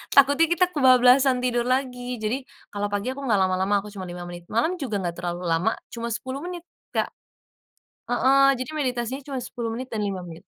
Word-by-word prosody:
takutnya 285 +4 +6
kita 345 +2 +3
kebablasan 255 -2 +5
tidur 240 -1 +1
lagi. 250 -1 -1
Jadi, 240 +4 -3 0.2
kalo 205 0 -2
pagi 205 +5 -2
aku 265 - -7
gak 215 - +4
lama-lama 190 +2 +1
aku 210 - -9
cuman 190 -3 -7
5 175 0 -7
menit, 175 0 -9
malam 320 - 0
juga 245 -7 -3
gak 170 -1 -2
terlalu 175 0 -3
lama, 175 +6 +1 0.2
cuma 235 0 -4
10 260 +4 -4
menit, 350 +2 -6 0.3
Kak - - 0 0.9
heeh, 270 +2 +4
jadi 255 +3 -4
meditasinya 255 -2 -2
cuma 270 -1 -5
10 235 -1 -4
menit 245 +3 -4
dan 220 -4 -3
5 190 -3 -3
menit. 165 -1 -10
245 Hz, 185 wpm, -25 LUFS, 205-265 Hz, 0.9 s, takutnya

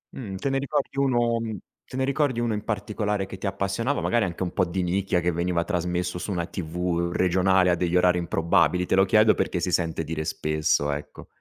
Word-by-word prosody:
Mh, 100 -7 -6
te 135 +8 -2
ne 135 0 +1
ricordi 140 0 -2
1 120 -4 +2 0.5
te 130 - -8
ne 130 - +1
ricordi 140 -3 0
1 120 -2 0
in 105 - -3
particolare 105 -1 -2
che 95 0 -9
ti 100 - -7
appassionava? 100 +8 -1
Magari 120 -2 +1
anche 90 0 -6
un 90 - -4
po' - - +2
di 90 +2 -2
nicchia, 90 +1 0
che 90 0 0
veniva 85 0 0
trasmesso 90 -1 -2
su 100 - -4
una 85 -2 -1
TV 85 0 -2
regionale 95 0 +3
a - - +3
degli 90 0 -1
orari 90 0 +4
improbabili? 85 +1 +2
Te - - +1
lo 95 +1 +5
chiedo 110 +2 +5
perché 90 - -1
si 90 - -1
sente 80 -2 0
dire 80 0 -3
spesso, 75 -1 0
ecco. 75 +1 -7
90 Hz, 210 wpm, -25 LUFS, 85-105 Hz, 0.5 s, lo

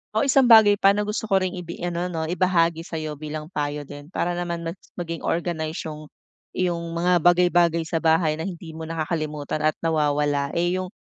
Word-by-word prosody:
Oh, 220 - +3
isang 270 -2 +4
bagay 215 -3 +7
pa 195 +1 +5
na 210 - 0
gusto 210 +1 -3
ko 195 - +2
ring 185 - -1
ibi 170 0 -8
ano, 175 0 -2
'no, 165 -3 -3
ibahagi 170 -1 +1
sa 165 0 -7
'yo 155 -2 -4
bilang 155 +1 -6
payo 145 -2 -3
din 145 +1 -11
para 175 0 -2
naman 175 -1 -3
mas 165 +3 -5 0.2
maging 170 -2 -4
organized 165 -1 -2
'yong 155 -1 -8 0.5
iyong 170 -2 -2
mga 175 +1 +3
bagay-bagay 175 -1 +3
sa 160 0 -2
bahay 160 -1 +2
na 165 - -3
hindi 170 -3 -8
mo 160 0 -7
nakakalimutan 155 -2 -3
at 155 0 +1
nawawala, 145 -3 +1
eh, 175 +2 +1
'yong 185 - -4
170 Hz, 195 wpm, -24 LUFS, 155-180 Hz, 0.5 s, bagay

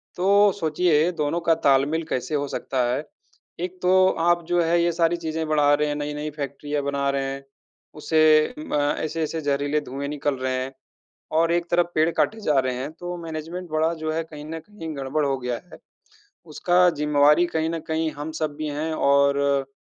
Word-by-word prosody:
तो 200 +3 +4
सोचिए 160 +1 +2
दोनों 150 +4 0
का - - +7
तालमेल 140 +4 +3
कैसे 130 +4 -2
हो 145 -1 -1
सकता 130 -2 -2
है। 145 - -2 0.6
एक 180 +1 -4
तो 185 +1 +5
आप 175 +1 +2
जो 175 0 +2
है 170 +1 +2
ये 170 - +2
सारी 170 +1 +1
चीज़ें 160 -1 -3
बढ़ा 150 -1 +3
रहे 150 +1 +2
हैं, 145 - -2
नई-नई 150 +1 -4
फैक्ट्रियाँ 145 +1 -3
बना 140 0 -1
रहे 140 0 0
हैं, 135 0 -8 0.5
उसे 155 +4 +3
म 310 - -7 0.3
ऐसे-ऐसे 160 0 -2
ज़हरीले 145 +1 0
धुएँ 140 +1 -5
निकल 145 -1 -1
रहे 130 0 -2
हैं 135 +1 -7 0.7
और 165 +1 +3
एक 175 0 +1
तरफ 175 0 +2
पेड़ 155 +1 +3
काटे 220 0 +1
जा 150 -8 +2
रहे 130 -1 -2
हैं 135 +4 -4
तो 175 0 -5
मैनेजमेंट 165 +3 -6
बड़ा 155 +1 +1
जो 155 -1 -3
है 165 - -1
कहीं 150 -2 -10
न 160 +1 -5
कहीं 210 -6 -9
गड़-बड़ 140 +2 -1
हो 135 -1 0
गया 125 -1 -3 0.2
है। - - -11 0.8
उसका 180 +2 +4
ज़िम्मेवारी 150 +3 +4
कहीं 160 0 0
न 165 -1 -3
कहीं 160 0 0
हम 150 +2 -5
सब 150 -2 -2
भी 155 -1 -3
हैं 160 +1 -2
और 140 -1 +3 0.3
अ, 135 - -39
155 Hz, 195 wpm, -24 LUFS, 145-165 Hz, 0.8 s, का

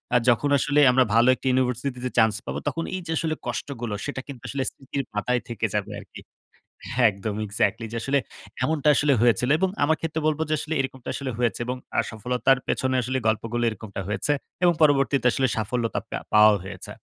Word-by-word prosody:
আ - - +8
যখন 125 +4 +2
আসলে 145 +2 +2
আমরা 130 +1 +4
ভালো 115 +2 +5
১ - - -6
টি - - -1
ইউনিভার্সিটিতে 125 0 -1
চান্স 110 -2 +5
পাবো, - - -3
তখন 155 +4 -1
এই 185 - -4
যে - - -3
আসলে 160 0 -1
কষ্টগুলো 120 -2 -4
সেটা 145 -2 -4
কিন্তু 130 -5 -9
আসলে 135 -1 -2
স্মৃতির 140 0 -5
পাতায় 125 +4 0
থেকে 115 -1 -2
যাবে 105 0 -1
আরকি। - - -12 0.7
হ্যাঁ, 120 -1 +5
একদম 100 +2 -5
Exactly 110 +2 0
যে 115 - -3
আসলে 140 +3 +1 0.4
এমনটা 150 -1 +2
আসলে 145 -1 +3
হয়েছিল। 120 +1 +3
এবং 190 0 +2
আমার 160 +2 +2
ক্ষেত্রে 160 0 -2
বলব 155 0 0
যে - - +1
আসলে 155 +2 -4
এরকমটা 130 -1 -6
আসলে 135 -2 -4
হয়েছে 120 -1 0
এবং 125 +1 -3 0.2
আ - - +5
সফলতার 125 +4 +1
পেছনে 130 0 0
আসলে 130 +2 -1
গল্পগুলো 115 +2 0
এরকমটা 105 -2 -7
হয়েছে। 105 +8 0 0.3
এবং 175 - +5
পরবর্তীতে 140 -3 +3
আসলে 130 +2 +1
সাফল্যতা 115 +2 -1
পেয়া - - -4
পাওয়াও 105 -1 +7
হয়েছে। - - -8
125 Hz, 195 wpm, -25 LUFS, 115-140 Hz, 0.7 s, আ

